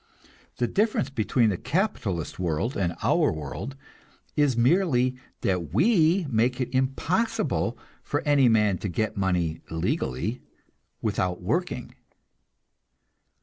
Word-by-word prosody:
The 120 Hz, -, +1 dB
difference 200 Hz, -, +1 dB
between 115 Hz, -2 st, +2 dB
the 90 Hz, -, -3 dB
capitalist 115 Hz, -, -2 dB
world 90 Hz, -, -1 dB
and 90 Hz, -4 st, -1 dB
our -, -, +3 dB
world 80 Hz, -, -6 dB, 0.6 s
is 145 Hz, -5 st, +2 dB
merely 130 Hz, -2 st, +3 dB, 0.3 s
that 90 Hz, -, -1 dB
we 175 Hz, -, +4 dB
make 125 Hz, 0 st, +1 dB
it 125 Hz, -, -2 dB
impossible 150 Hz, -, 0 dB, 0.2 s
for -, -, -2 dB
any 140 Hz, -4 st, +5 dB
man 105 Hz, -5 st, +3 dB
to 100 Hz, -, -3 dB
get 110 Hz, +4 st, -1 dB
money 90 Hz, -5 st, 0 dB
legally 110 Hz, -, -2 dB, 0.6 s
without 90 Hz, -1 st, 0 dB
working. 145 Hz, -, -2 dB
120 Hz, 110 wpm, -26 LUFS, 95-145 Hz, 0.6 s, any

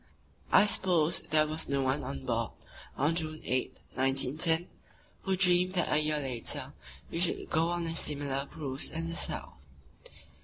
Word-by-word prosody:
I 205 Hz, -, +7 dB
suppose 175 Hz, -5 st, +2 dB
there 155 Hz, 0 st, +4 dB
was 155 Hz, +1 st, -3 dB
no 140 Hz, -1 st, +1 dB
one 130 Hz, +2 st, +1 dB
on 70 Hz, -1 st, -5 dB
board -, -, -1 dB, 0.4 s
on 145 Hz, +5 st, +2 dB
June 155 Hz, -2 st, -3 dB
8, 130 Hz, 0 st, -1 dB, 0.2 s
1910, 135 Hz, +6 st, +2 dB, 0.5 s
who 190 Hz, -2 st, 0 dB
dreamed 180 Hz, 0 st, +4 dB
that 180 Hz, -, +1 dB
a 150 Hz, -, +4 dB
year 150 Hz, 0 st, 0 dB
later 135 Hz, +1 st, -3 dB, 0.4 s
we 165 Hz, -, -2 dB
should 175 Hz, -, 0 dB
go 160 Hz, +2 st, +2 dB
on 175 Hz, -1 st, -1 dB
a 165 Hz, -, -2 dB
similar 140 Hz, -3 st, -1 dB
cruise 140 Hz, -3 st, -5 dB
in 165 Hz, +1 st, -3 dB
the 170 Hz, -, -4 dB
South. -, -, -4 dB
155 Hz, 160 wpm, -31 LUFS, 140-170 Hz, 0.5 s, I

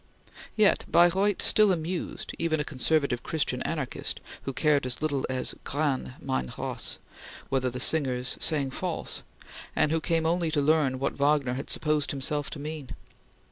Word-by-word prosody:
Yet 215 Hz, -2 st, +3 dB
Baireuth 185 Hz, +4 st, +4 dB
still 210 Hz, -2 st, +6 dB
amused 175 Hz, +1 st, -3 dB
even 160 Hz, -2 st, +1 dB
a -, -, +1 dB
conservative 140 Hz, -3 st, 0 dB
Christian 140 Hz, -6 st, -1 dB
anarchist 150 Hz, -6 st, -2 dB, 0.3 s
who 135 Hz, -, -2 dB
cared 145 Hz, -1 st, +2 dB
as 125 Hz, -, 0 dB
little 145 Hz, -3 st, -1 dB
as 130 Hz, -1 st, -1 dB
"Grane, 140 Hz, -3 st, -1 dB
mein 130 Hz, -, -2 dB
Ross," -, -, -2 dB, 0.5 s
whether 130 Hz, -1 st, +1 dB
the 125 Hz, +1 st, -6 dB
singers 125 Hz, -3 st, +3 dB
sang 140 Hz, -4 st, +1 dB
false, 175 Hz, +4 st, -4 dB, 0.5 s
and 155 Hz, -, +2 dB
who 165 Hz, 0 st, +1 dB
came 165 Hz, 0 st, 0 dB
only 170 Hz, 0 st, +1 dB
to 155 Hz, -1 st, +1 dB
learn 145 Hz, -3 st, +2 dB
what 135 Hz, +1 st, -1 dB
Wagner 140 Hz, -3 st, +2 dB
had 135 Hz, +3 st, -5 dB
supposed 150 Hz, -2 st, 0 dB
himself 145 Hz, +1 st, -1 dB
to -, -, -7 dB
mean. 150 Hz, -2 st, -6 dB
150 Hz, 155 wpm, -27 LUFS, 130-160 Hz, 0.5 s, still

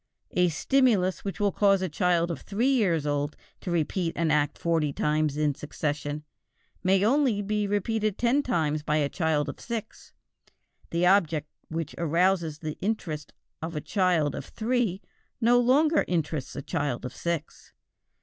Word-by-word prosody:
A 180 Hz, -1 st, +3 dB
stimulus 205 Hz, -, +2 dB
which 195 Hz, -4 st, -4 dB
will 205 Hz, -1 st, +2 dB
cause 195 Hz, -2 st, +3 dB
a -, -, 0 dB
child 175 Hz, +1 st, +1 dB
of 145 Hz, -6 st, -5 dB
three 235 Hz, +7 st, +1 dB
years 175 Hz, -, +2 dB
old 145 Hz, 0 st, -1 dB, 0.2 s
to -, -, -6 dB
repeat 170 Hz, +1 st, 0 dB
an 165 Hz, -2 st, +1 dB
act 150 Hz, -1 st, +1 dB
forty 165 Hz, -3 st, +1 dB
times 150 Hz, 0 st, 0 dB
in 150 Hz, -1 st, +2 dB
succession, 150 Hz, +1 st, -4 dB, 0.6 s
may 190 Hz, +1 st, +3 dB
only 245 Hz, -4 st, +2 dB
be 210 Hz, 0 st, 0 dB
repeated 210 Hz, +1 st, 0 dB
ten 245 Hz, +4 st, +3 dB
times 155 Hz, -, 0 dB
by 150 Hz, 0 st, 0 dB
a 145 Hz, -2 st, +1 dB
child 160 Hz, -4 st, 0 dB
of -, -, -6 dB
six; 225 Hz, -3 st, -6 dB, 0.8 s
the 170 Hz, +1 st, +1 dB
object 165 Hz, -5 st, +3 dB, 0.2 s
which 160 Hz, -1 st, -4 dB
arouses 170 Hz, -1 st, +1 dB
the 155 Hz, -1 st, -6 dB
interest 180 Hz, -8 st, -3 dB, 0.3 s
of 165 Hz, +1 st, -5 dB
a -, -, -1 dB
child 175 Hz, -5 st, +1 dB
of -, -, -5 dB
three 225 Hz, -4 st, -1 dB, 0.4 s
no 240 Hz, +1 st, +5 dB
longer 295 Hz, +6 st, +4 dB
interests 155 Hz, -5 st, -2 dB
a -, -, -5 dB
child 145 Hz, -7 st, -2 dB
of 125 Hz, -, -5 dB
six. 170 Hz, -2 st, -4 dB
170 Hz, 160 wpm, -27 LUFS, 150-205 Hz, 0.8 s, no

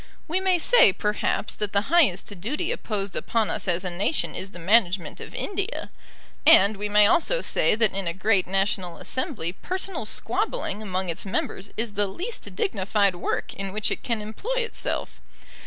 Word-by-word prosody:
We 340 Hz, +4 st, 0 dB
may 375 Hz, -1 st, +2 dB
say, 415 Hz, -, +6 dB
perhaps, 210 Hz, +1 st, -1 dB
that 210 Hz, -2 st, -4 dB
the 200 Hz, -, +4 dB
highest 205 Hz, -, +3 dB
duty 255 Hz, +10 st, -1 dB
imposed 200 Hz, -3 st, -3 dB
upon 225 Hz, -2 st, 0 dB
us -, -, -3 dB
as 180 Hz, 0 st, 0 dB
a 180 Hz, -, -3 dB
nation 195 Hz, -, 0 dB
is 190 Hz, -, -4 dB
the 190 Hz, -, -10 dB
management 185 Hz, 0 st, +2 dB
of -, -, -9 dB
India; 400 Hz, +4 st, -3 dB, 0.5 s
and 200 Hz, +3 st, +7 dB
we 210 Hz, +1 st, -4 dB
may 210 Hz, 0 st, +6 dB
also 345 Hz, -, +3 dB
say -, -, +2 dB
that 220 Hz, -2 st, +2 dB
in 195 Hz, -2 st, 0 dB
a -, -, +1 dB
great 195 Hz, 0 st, +2 dB
national 195 Hz, -2 st, 0 dB
assembly 245 Hz, -, -2 dB
personal 370 Hz, -, -4 dB
squabbling 215 Hz, -, -2 dB
among 190 Hz, -3 st, -2 dB
its 170 Hz, +3 st, -3 dB
members 195 Hz, 0 st, -3 dB
is 225 Hz, -1 st, -2 dB
the 205 Hz, 0 st, +1 dB
least 375 Hz, -, -7 dB
dignified 200 Hz, -, +1 dB
work -, -, -3 dB
in 195 Hz, -1 st, -5 dB
which 210 Hz, +1 st, -1 dB
it -, -, -2 dB
can 230 Hz, -3 st, -2 dB
employ 400 Hz, -, -4 dB
itself. 465 Hz, -, -4 dB
210 Hz, 175 wpm, -25 LUFS, 190-260 Hz, 0.5 s, and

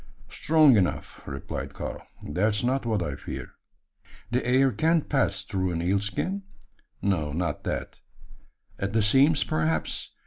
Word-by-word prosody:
"Strong 155 Hz, -6 st, +5 dB
enough," 90 Hz, -3 st, -1 dB
replied 70 Hz, -1 st, -5 dB
Karl. -, -, -5 dB, 0.3 s
"That's 105 Hz, +8 st, +1 dB
not 130 Hz, 0 st, 0 dB
what 105 Hz, -5 st, +1 dB
I 75 Hz, -4 st, -3 dB
fear." -, -, -7 dB, 0.8 s
"The 125 Hz, +2 st, +1 dB
air 130 Hz, +2 st, +4 dB
can't 160 Hz, +3 st, +2 dB
pass 100 Hz, -8 st, +1 dB
through 95 Hz, -2 st, -1 dB
an 85 Hz, -, -1 dB
eel 95 Hz, +3 st, +2 dB
skin?" 105 Hz, -, -2 dB, 0.6 s
"No 80 Hz, -7 st, +1 dB
not 85 Hz, +2 st, -2 dB
that." -, -, -4 dB, 0.8 s
"At 100 Hz, +1 st, -2 dB
the 110 Hz, -1 st, +3 dB
seams, 135 Hz, +7 st, +4 dB
perhaps? 80 Hz, 0 st, -1 dB
105 Hz, 140 wpm, -27 LUFS, 90-135 Hz, 0.8 s, Strong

